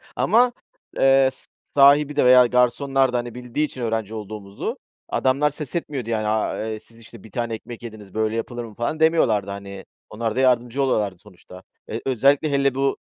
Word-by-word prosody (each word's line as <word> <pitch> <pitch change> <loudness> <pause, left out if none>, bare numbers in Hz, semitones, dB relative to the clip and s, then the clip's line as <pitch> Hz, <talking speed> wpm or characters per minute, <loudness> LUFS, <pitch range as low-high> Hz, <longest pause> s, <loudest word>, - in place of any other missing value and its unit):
ama, 245 +2 +3 0.4
eee, 135 0 +5
s - - -15 0.3
sahibi 145 +1 +5
de 145 - +3
veya 125 0 +7
garsonlar 125 +2 +2
da, - - +2
hani, 120 -1 -5
bildiği 125 +4 -2
için 130 -3 -9
öğrenci 110 -2 -2
olduğumuzu 105 -2 -6 0.3
adamlar 140 +3 +1
ses 150 -1 -7
etmiyordu, 140 -8 -3
yani, 110 -2 -1
aaa, 110 0 -1
eee, 110 -1 -5
"Siz, 115 +1 -16
işte, 115 -2 -13
1 110 - -14
tane 120 +1 -3
ekmek 115 +1 -8
yediniz. 105 -4 -10
Böyle 110 0 -1
yapılır 120 +1 -4
mı?" 110 -2 -12
falan 120 +8 -3
demiyorlardı, 120 - +2
hani, 100 0 -8 0.2
onlar 115 0 -3
da - - 0
yardımcı 125 0 +2
oluyorlardı 105 -8 0
sonuçta. 90 -1 -15 0.2
Eee, - - -5
özellikle 140 +4 +2
hele 140 -1 +1
bu, 135 0 0
120 Hz, 185 wpm, -22 LUFS, 110-135 Hz, 0.4 s, veya